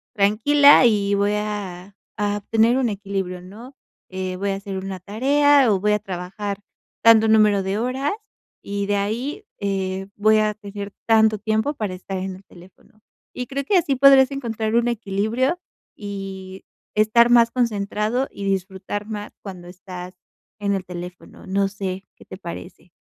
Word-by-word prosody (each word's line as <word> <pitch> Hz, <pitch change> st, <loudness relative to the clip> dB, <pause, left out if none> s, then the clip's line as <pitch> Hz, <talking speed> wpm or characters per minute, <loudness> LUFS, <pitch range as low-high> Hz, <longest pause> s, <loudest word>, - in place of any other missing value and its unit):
tranquila 260 Hz, +8 st, +6 dB
y 205 Hz, -3 st, +2 dB
voy 200 Hz, +1 st, +1 dB
a 200 Hz, -3 st, -5 dB, 0.2 s
a 205 Hz, -1 st, 0 dB
obtener 225 Hz, +4 st, +2 dB
un 255 Hz, -3 st, +1 dB
equilibrio", 195 Hz, -3 st, -4 dB
¿no?, 225 Hz, +9 st, -12 dB, 0.3 s
"eh, 185 Hz, -1 st, -4 dB
voy 200 Hz, +1 st, -1 dB
a -, -, -1 dB
hacer 195 Hz, 0 st, -6 dB
una 190 Hz, 0 st, -5 dB
tarea 270 Hz, +6 st, +3 dB
o 195 Hz, -, +2 dB
voy 210 Hz, +2 st, +2 dB
a 210 Hz, -, +1 dB
trabajar 195 Hz, +2 st, -5 dB, 0.4 s
tanto 225 Hz, -1 st, +7 dB
número 210 Hz, -2 st, +4 dB
de 190 Hz, +2 st, -2 dB
horas, 260 Hz, -, -1 dB, 0.5 s
y 200 Hz, 0 st, -3 dB
de 205 Hz, -, +1 dB
ahí, 245 Hz, -, -3 dB
eh, 195 Hz, -1 st, -2 dB
voy 215 Hz, +1 st, +4 dB
a 215 Hz, 0 st, +1 dB
tener 205 Hz, -1 st, -8 dB, 0.2 s
tanto 220 Hz, -1 st, +4 dB
tiempo 220 Hz, +6 st, 0 dB
para 210 Hz, -7 st, -3 dB
estar 190 Hz, +1 st, -6 dB
en 185 Hz, 0 st, -4 dB
el 190 Hz, -, -18 dB
teléfono". 185 Hz, +4 st, -19 dB, 0.3 s
Y 250 Hz, -, -3 dB
creo 280 Hz, 0 st, -3 dB
que 390 Hz, -, +3 dB
así 310 Hz, -6 st, +1 dB
podrás 265 Hz, 0 st, +6 dB
encontrar 225 Hz, -5 st, -3 dB
un 235 Hz, 0 st, +3 dB
equilibrio, 230 Hz, -, -1 dB, 0.4 s
y 195 Hz, -2 st, -7 dB, 0.3 s
estar 215 Hz, +3 st, +4 dB
más 235 Hz, -1 st, +5 dB
concentrado, 220 Hz, +1 st, -1 dB
y 200 Hz, -, -7 dB
disfrutar 195 Hz, +1 st, -3 dB
más 210 Hz, -1 st, -6 dB
cuando 185 Hz, -3 st, -9 dB
estás 180 Hz, 0 st, -9 dB, 0.4 s
en 200 Hz, -1 st, 0 dB
el 190 Hz, -1 st, -4 dB
teléfono, 175 Hz, 0 st, -9 dB
no 195 Hz, +1 st, +1 dB
sé, 195 Hz, -1 st, -5 dB
¿qué -, -, -18 dB
te 185 Hz, -, -10 dB
parece? 175 Hz, -1 st, -9 dB
205 Hz, 160 wpm, -22 LUFS, 195-230 Hz, 0.5 s, tanto